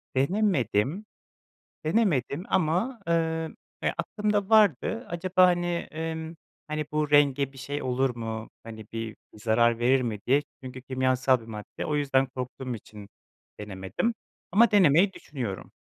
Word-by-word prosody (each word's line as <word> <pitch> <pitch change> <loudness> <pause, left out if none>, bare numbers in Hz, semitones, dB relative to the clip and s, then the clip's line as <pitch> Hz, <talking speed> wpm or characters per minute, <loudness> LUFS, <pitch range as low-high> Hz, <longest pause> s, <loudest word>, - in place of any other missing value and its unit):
Denemedim, 145 - +1 0.8
denemedim 155 - +1
ama, 185 +9 +1
eee, 170 - +3 0.7
ya, - - 0
aklımda 210 -2 -1
vardı. 200 - +3
"Acaba, 185 +2 +3
hani, 175 -1 0
ımm, 160 0 -4 0.3
hani, 155 0 -2
bu 150 -1 0
renge 140 -2 +4
bir 135 - -14
şey 145 +2 -4
olur 130 0 0
mu, 110 -1 -5
hani, 110 -2 -9
bir 115 -1 -5 0.2
zarar 115 +2 +2
verir 130 +3 +3
mi?" 110 -4 -2
diye. 140 +3 +4 0.2
Çünkü 130 0 -8
kimyasal 130 -1 +2
bir 110 - -14
madde. 105 -2 -7
O 150 - 0
yüzden 135 -2 +2
korktuğum 125 0 -5
için 105 -2 -11 0.5
denemedim 95 - -2 0.4
ama 225 +3 +6
denemeyi 190 -1 +5
düşünüyorum. 120 - -6
135 Hz, 130 wpm, -27 LUFS, 120-170 Hz, 0.8 s, ama